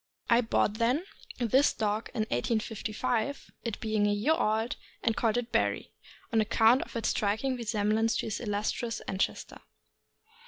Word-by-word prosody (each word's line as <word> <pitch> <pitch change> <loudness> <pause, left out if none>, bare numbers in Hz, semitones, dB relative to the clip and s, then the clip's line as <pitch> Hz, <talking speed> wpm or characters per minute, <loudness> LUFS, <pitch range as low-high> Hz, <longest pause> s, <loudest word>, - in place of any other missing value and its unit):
I 235 +1 +6
bought, 220 -1 +1
then, 250 +9 +2 0.3
this 255 +4 +3
dog 215 0 -1
in 225 - 0
1855, 220 - -2
it 230 -3 -3
being 215 -2 +1
a - - +2
year 210 +10 +2
old, 220 -4 0 0.3
and 225 - +2
called 230 -1 +1
it 245 -1 -3
Barry, - - 0 0.4
on 225 - +4
account 225 +4 +4
of - - -8
its 230 -1 0
striking 220 +6 0
resemblance 220 -1 +1
to - - -2
its 215 -1 -3
illustrious 220 +2 -2
ancestor. 190 0 -3
225 Hz, 150 wpm, -29 LUFS, 215-240 Hz, 0.4 s, I